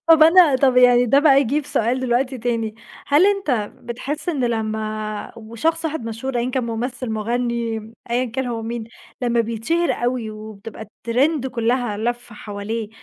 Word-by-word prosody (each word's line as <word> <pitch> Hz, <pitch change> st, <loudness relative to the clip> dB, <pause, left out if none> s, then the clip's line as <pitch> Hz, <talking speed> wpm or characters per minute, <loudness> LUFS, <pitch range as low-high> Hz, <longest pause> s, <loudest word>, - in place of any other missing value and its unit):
طَب 325 Hz, -1 st, +7 dB
أنا 325 Hz, -4 st, +7 dB
طَب 260 Hz, -1 st, +3 dB
يعني 245 Hz, -1 st, +6 dB
ده 275 Hz, +5 st, +5 dB
بقى 280 Hz, -2 st, +6 dB
يجيب 280 Hz, +3 st, 0 dB
سؤال 240 Hz, +3 st, 0 dB
دلوقتي 255 Hz, +1 st, 0 dB
تاني، 225 Hz, -2 st, -2 dB, 0.3 s
هل 295 Hz, +7 st, +5 dB
أنت 295 Hz, -, 0 dB
بتحسّ 275 Hz, +7 st, -5 dB
إن 285 Hz, -7 st, 0 dB
لمّا 215 Hz, -2 st, -3 dB
وشخص 230 Hz, +10 st, -2 dB
واحد 320 Hz, -6 st, -2 dB
مشهور 230 Hz, +3 st, -3 dB
أيًا 240 Hz, +2 st, -1 dB
كان 255 Hz, -1 st, -1 dB
ممثل، 240 Hz, +2 st, -3 dB
مغني 235 Hz, +1 st, -1 dB
م 220 Hz, +1 st, -11 dB, 0.2 s
أيًا 245 Hz, +2 st, +1 dB
كان 255 Hz, +2 st, -3 dB
هو 230 Hz, -2 st, -3 dB
مين 230 Hz, 0 st, -4 dB, 0.4 s
لمّا 240 Hz, -1 st, +2 dB
بيتشهر 230 Hz, +10 st, 0 dB
أوي 240 Hz, -2 st, -2 dB
وبتبقى 215 Hz, 0 st, -9 dB
الtrend 255 Hz, +7 st, 0 dB
كلّها 240 Hz, -2 st, 0 dB
لافة 240 Hz, +1 st, -3 dB
حواليه 210 Hz, +1 st, -5 dB
240 Hz, 160 wpm, -21 LUFS, 225-265 Hz, 0.4 s, طَب